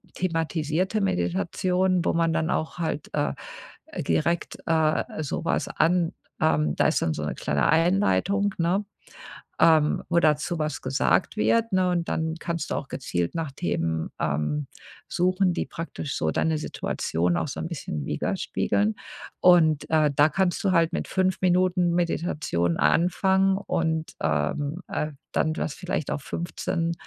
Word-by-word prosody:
thematisierte 165 +3 -1
Meditation, 180 - 0
wo - - +2
man 165 -1 +2
dann 160 0 0
auch 160 - -2
halt, 160 -3 -3
äh, 145 0 0 0.7
direkt, 85 - 0
äh, 155 -1 +1
so 145 - -3
was - - 0
an 170 +1 +2 0.3
ähm, 75 -1 +2
da - - +3
ist - - +1
dann 80 - +1
so 75 - -4
'ne - - -2
kleine 75 0 0
Einleitung, 195 +3 +2
ne, 175 +5 +1 0.8
ähm, 155 -2 +4
wo 170 0 +3
dazu 155 +2 +1
was 155 0 -2
gesagt 135 +10 +1
wird, 230 0 +2
ne? 185 -1 +3
Und 175 -1 -1
dann 160 0 -1
kannst 170 -3 -3
du - - 0
auch 135 - -5
gezielt 85 - -3
nach 160 -4 -3
Themen, 80 - -2
ähm, 75 -1 -1 0.4
suchen, 185 +1 +2
die - - -1
praktisch 165 -3 -5
so 80 - 0
deine 160 -1 +1
Situation 85 - -1
auch - - -1
so - - -5
'n 165 - -3
bisschen 75 - -5
widerspiegeln. 105 +1 -1 0.4
Und, 160 -4 +5
äh, 155 -2 +4
da 145 +2 +5
kannst 175 +4 0
du 190 - +3
halt 165 -2 +3
mit - - -2
5 185 -1 0
Minuten 180 -1 +2
Meditation 155 - 0
anfangen 190 - +3
und, 160 -4 -2
ähm, 140 - -1
äh, 150 0 -2 0.2
dann 155 - +1
das 155 - -2
vielleicht 180 -5 -3
auf 145 - -3
15 170 0 -2
160 Hz, 150 wpm, -25 LUFS, 140-180 Hz, 0.8 s, Und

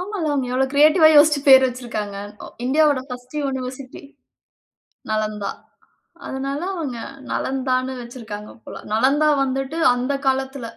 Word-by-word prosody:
ஆமா. 410 +3 -5
அவங்க 275 -3 -1
எவ்வளோ 265 +1 +1
கிரியேட்டிவ்வா 310 +3 +6
யோசிச்சு 295 0 +6
பேர் 265 -1 +8
வச்சிருக்கிறாங்க. 230 -5 -5 0.5
இந்தியாவோட 290 0 +3
பர்ஸ்ட் 250 +2 -9
யுனிவர்சிட்டி. 260 -1 -5 1.1
நலந்தா. 215 -2 -2 0.8
அதனால 275 +1 -4
அவங்க 290 -10 -4 0.3
நலந்தான்னு 260 -1 -1
வச்சிருக்கங்க 220 -4 -9
போல. - - -9 0.2
நலந்தா 275 +7 +3
வந்துட்டு 270 +3 -3 0.2
அந்த 255 +3 -2
காலத்தில 265 -1 -1
265 Hz, 110 wpm, -21 LUFS, 245-280 Hz, 1.1 s, பேர்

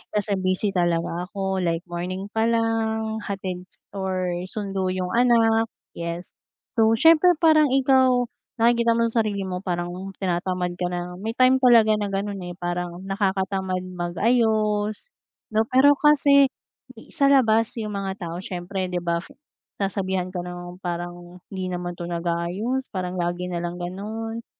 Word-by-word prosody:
kasi 205 -1 0
busy 185 +2 0
talaga 175 -1 0
ako 190 -1 -2
like, 170 -2 -1
morning 185 +3 -5
pa 220 +1 +1
lang, 220 -1 0
hatid 185 -2 -4
s - - -5 0.2
or 190 -2 -2 0.2
sundo 195 -2 -2
yung 185 0 -2
anak 230 -2 +4 0.2
yes. 170 +1 -5 0.4
So, 225 -1 +3
siyempre, 330 +6 +6
parang 310 -2 +6
ikaw, 260 -2 +4 0.4
nakikita 235 0 +3
mo 230 - +2
sa 230 - +2
sarili 205 -3 -1
mo 185 -1 -3
parang 175 -2 -3 0.3
tinatamad 180 -1 -2
ka 180 - 0
na. 180 0 -5
May 220 +3 -4
time 255 +1 +5
talaga 235 -4 +6
na 205 - -1
ganun 200 0 -3
eh, 175 -1 -7
parang 175 0 -4
nakakatamad 190 -1 -1
mag-ayos, 210 - 0 0.4
'no? 220 +1 +2
Pero 265 +4 +6
kasi 285 -2 +6 0.6
sa 290 -4 +2
labas, 225 -4 +4
yung 210 -1 -4
mga 195 -2 -4
tao, 165 - -5
siyempre, 185 +1 -4
'di 175 0 -1
ba, 170 -1 0 0.6
sasabihan 190 -2 -1
ka 180 -1 -4
ng 175 0 -8
parang, 175 0 -6
"Hindi 185 -1 -4
naman 175 0 -4
'to 175 - -5
nag-aayos, 175 +9 -2
parang 185 -1 -3
lagi 175 +1 -2
nalang 175 0 -4
ganun." 220 +5 -5
195 Hz, 145 wpm, -24 LUFS, 180-225 Hz, 0.6 s, siyempre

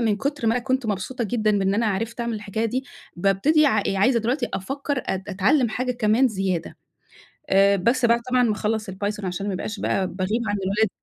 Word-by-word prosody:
من 220 -3 +1
كُتر 280 +2 -2
ما 225 - +4
أنا 245 - -1
كنت 260 -1 -1
مبسوطة 220 +4 -2
جدًا 215 -1 +1
بإن 195 0 +1
أنا 225 +2 +1
عرفت 225 +4 -2
أعمل 235 -1 -2
الحكاية 210 +1 -3
دي 255 +4 -1 0.3
بابتدي 200 - +3
ع 275 - +2
عايزة 205 +6 +3
دلوقتي 240 +1 -1
أفكر 275 +6 -3
أت 190 0 -2
أتعلم 235 +7 +2
حاجة 250 +3 -2
كمان 240 +2 +3
زيادة. 190 -5 -2 0.7
آآ 195 +1 +5
بس 235 +6 +2
بعد 235 0 +4
طبعًا 250 -1 +4
ما 230 - +2
أخلّص 215 0 -2
الPython 205 +2 -4
عشان 185 +2 -3
ما 200 - -1
أبقاش 210 +3 -4
بقى، 190 - 0
باغيب 190 +6 -2
عن 205 - 0
الولاد 205 +3 +1
215 Hz, 200 wpm, -23 LUFS, 195-245 Hz, 0.7 s, آآ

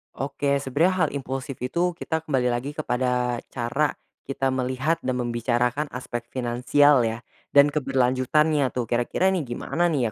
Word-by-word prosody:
Oke, 140 0 -1
sebenarnya 165 +6 +2
hal - - -4
impulsif 135 0 -4
itu 170 +7 0
kita 160 -2 -2
kembali 130 -4 +1
lagi 130 +5 -3
kepada 125 -4 0
cara 135 +5 -1 0.3
kita 135 -1 -1
melihat, 130 +5 0
dan 130 -3 -2
membicarakan 120 +4 0
aspek 120 -2 -6
finansial 125 +3 +3
ya, 115 +2 -5 0.3
dan 145 +1 +7
keberlanjutannya 135 +2 +2
tuh. 125 - 0
Kira-kira 120 +10 +1
ini 190 - 0
gimana 170 +8 -1
nih 130 -9 0
130 Hz, 140 wpm, -24 LUFS, 125-150 Hz, 0.3 s, dan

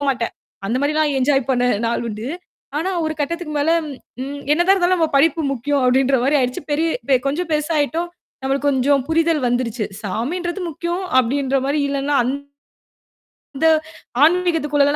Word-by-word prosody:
போ - - -4
மாட்டேன். 240 -3 -1 0.3
அந்த 230 +5 0
மாரிலாம் 300 0 +1
என்ஜாய் 270 -1 +2
பண்ண 250 -1 +2 0.2
நாள் 235 +1 -1
உண்டு. 215 +2 -5 0.5
ஆனா, 355 +5 -1
ஒரு 315 - -1
கட்டத்துக்கு 325 +2 -3
மேல, 290 +3 +2 0.5
ம் 280 +2 -5
என்னதான் 345 +5 +4
இருந்தாலும் 370 -1 +2
நம்ம 325 -2 +2
படிப்பு 320 +3 +3
முக்கியம், 275 +2 0
அப்பிடின்ற 265 +1 +3
மாரி 285 +3 +3
ஆயிடுச்சு. 250 +1 -1
பெரிய 315 +3 +1 0.2
பெ 270 - +6
கொஞ்சம் 325 +5 -2
பெருசாயிட்டோம். 310 +2 0 0.3
நம்மளுக்கு 275 +2 0
கொஞ்சம் 275 0 +2
புரிதல் 325 -3 +2
வந்துருச்சு. 240 -3 -1 0.2
சாமின்றது 345 - -3
முக்கியம், 345 +4 -3 0.2
அப்பிடின்ற 270 +2 +1
மாரி. 285 +2 0
இல்லனா, 280 +1 0
அந் 250 +3 -1 1.3
த - - +5 0.6
ஆன்மீகத்துக்குள்ளலா 300 -4 +3
285 Hz, 150 wpm, -20 LUFS, 265-325 Hz, 1.3 s, பெ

